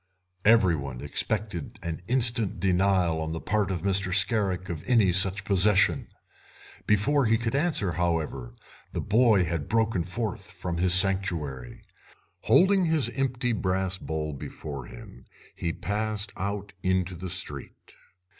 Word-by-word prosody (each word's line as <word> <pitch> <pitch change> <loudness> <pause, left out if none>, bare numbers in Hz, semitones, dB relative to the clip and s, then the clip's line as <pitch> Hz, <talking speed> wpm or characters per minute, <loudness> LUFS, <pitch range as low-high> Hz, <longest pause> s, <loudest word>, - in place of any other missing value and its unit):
Every 100 -6 +5
one 70 -4 -6
expected 105 -8 -3
an 80 -1 -5
instant 120 -6 +1
denial 90 -3 +1
on 80 0 -4
the 80 - -4
part 105 +2 -1
of 90 -3 -3
Mr. 95 -1 0
Scarrick 95 -2 +2
of 80 -3 -6
any 115 -7 +4
such 95 +2 +2
possession. 100 +1 +2 0.8
Before 130 +7 +3
he 115 0 +3
could 115 +1 -3
answer, 140 - +1
however, 80 -8 -2 0.4
the - - -3
boy 110 -3 +3
had 80 -3 -4
broken 110 -5 +1
forth 105 +3 -4
from 85 -2 -5
his 90 +1 +5
sanctuary. 90 -10 0 0.6
Holding 190 0 +4
his 155 -8 +2
empty 125 -2 -1
brass 95 -1 -1
bowl 75 -1 -4
before 70 -1 -7
him 60 - -13 0.3
he 85 - -3
passed 105 +1 -3
out 100 +1 -4
into 95 0 0
the 90 +2 -7
street. 85 -6 -2
95 Hz, 135 wpm, -26 LUFS, 85-110 Hz, 0.8 s, Every